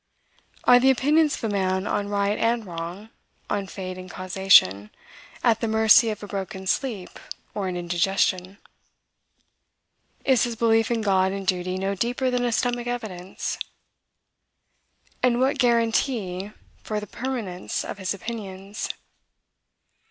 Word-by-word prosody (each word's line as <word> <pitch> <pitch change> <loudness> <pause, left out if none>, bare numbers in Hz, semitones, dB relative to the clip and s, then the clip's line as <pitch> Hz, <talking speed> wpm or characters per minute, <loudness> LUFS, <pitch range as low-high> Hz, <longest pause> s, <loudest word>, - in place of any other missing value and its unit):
Are 245 0 +7
the 265 +2 +4
opinions 295 +3 +3
of - - -11
a 220 -2 -1
man 190 -1 0
on 205 -1 -1
right 200 0 +1
and 230 -1 +1
wrong, 175 +5 -7 0.4
on 200 -2 -1
fate 185 -1 -6
and 185 0 -9
causation, 185 - +4 0.5
at 225 -2 +3
the 230 - 0
mercy 220 +1 +5
of 210 -1 -5
a - - -6
broken 190 -1 -5
sleep 210 -1 -2 0.3
or 200 -2 -2
an 180 -1 -3
indigestion? 180 +2 0 1.7
Is 260 -3 +4
his 240 -1 -4
belief 225 -1 +3
in 235 -2 0
God 190 -2 +2
and 195 0 -5
Duty 185 0 -1
no 195 +1 -1
deeper 245 +5 -1
than 245 0 0
a 240 - +1
stomach 245 0 0
evidence? 195 -7 -4 1.6
And 245 -1 +3
what 270 +2 +1
guaranty 230 -5 +1 0.3
for 215 -1 -3
the 210 - -7
permanence 220 -6 -4
of - - -6
his 190 -1 -2
opinions? 200 -1 -5
205 Hz, 135 wpm, -24 LUFS, 190-235 Hz, 1.7 s, Are